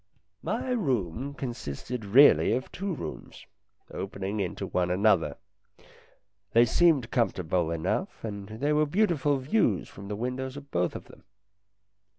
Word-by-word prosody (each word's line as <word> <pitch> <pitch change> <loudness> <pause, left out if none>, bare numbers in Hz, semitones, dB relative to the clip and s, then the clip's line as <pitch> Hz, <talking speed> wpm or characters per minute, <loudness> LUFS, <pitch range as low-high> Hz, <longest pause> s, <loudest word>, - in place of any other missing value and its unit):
My 255 - -2
room 135 - -1
consisted 120 - -5
really 130 +7 +6
of 130 - -4
two 195 +2 -4
rooms, 80 - -8 0.5
opening 100 +1 -4
into 95 -3 -3
one 90 -1 0
another. 90 -6 +2 1.2
They 115 +1 +6
seemed 140 -3 +3
comfortable 90 -7 0
enough, 85 -1 -2
and 100 -2 -6
there 135 +8 -1
were 150 0 +3
beautiful 150 -6 +2
views 130 - +1
from 100 0 -10
the 105 - -3
windows 130 +4 -4
of 140 -1 -11
both 90 0 0
of - - -7
them. - - -17
115 Hz, 135 wpm, -28 LUFS, 95-140 Hz, 1.2 s, really